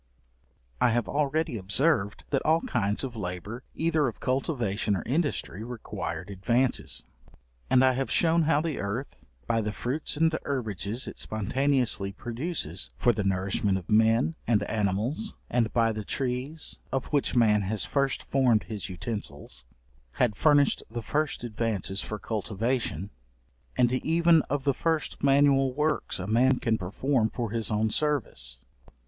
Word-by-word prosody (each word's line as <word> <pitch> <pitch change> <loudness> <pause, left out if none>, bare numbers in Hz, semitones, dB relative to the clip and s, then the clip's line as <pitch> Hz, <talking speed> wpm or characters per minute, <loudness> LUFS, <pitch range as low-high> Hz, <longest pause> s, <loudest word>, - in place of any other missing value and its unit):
I - - +5
have 120 +1 +1
already 150 -2 0
observed, 100 - +1
that 135 - +2
all 160 +2 +3
kinds 105 -1 -1
of 130 -3 -4
labour, 100 +4 -5
either 160 -3 +2
of 115 - -5
cultivation 120 -6 0
or 90 - -3
industry, 135 - -1
required 115 -5 -5
advances. 120 +7 0 0.6
And 130 0 +5
I 130 - +4
have 135 +1 -2
shewn 165 0 +3
how 150 -2 +3
the 160 -3 -2
earth, 100 - -4 0.2
by 115 0 +1
the 105 0 -2
fruits 130 +8 -2
and 160 +1 +4
herbages 110 -3 -2
it - - -8
spontaneously 120 -1 0
produces 120 - -3
for 120 - +3
the 105 - -2
nourishment 95 +1 +1
of 95 0 -8
men 115 +7 +4
and 110 -3 +3
animals, 110 - -1 0.2
and 120 -3 +2
by 115 -1 +3
the 110 -1 -4
trees, 130 +7 -3
of 135 - -1
which 145 -3 +1
man 110 -3 +4
has 100 0 -1
first 140 -1 0
formed 125 -5 +3
his 105 -3 -5
utensils, 90 - -5 0.5
had 120 -5 +1
furnished 145 0 +4
the 115 0 -5
first 150 -1 -1
advances 110 -4 -1
for 105 - -4
cultivation; 105 - -2 0.7
and 120 -1 +4
even 165 +4 +4
of 140 0 -1
the 140 -1 +2
first 160 +2 -1
manual 135 -2 +4
works 150 +1 0
a 90 - -4
man 125 +5 +3
can 115 -2 +1
perform 110 +5 0
for 115 -3 -3
his 115 -1 0
own 110 0 +1
service. 145 - -1
120 Hz, 150 wpm, -28 LUFS, 105-140 Hz, 0.7 s, I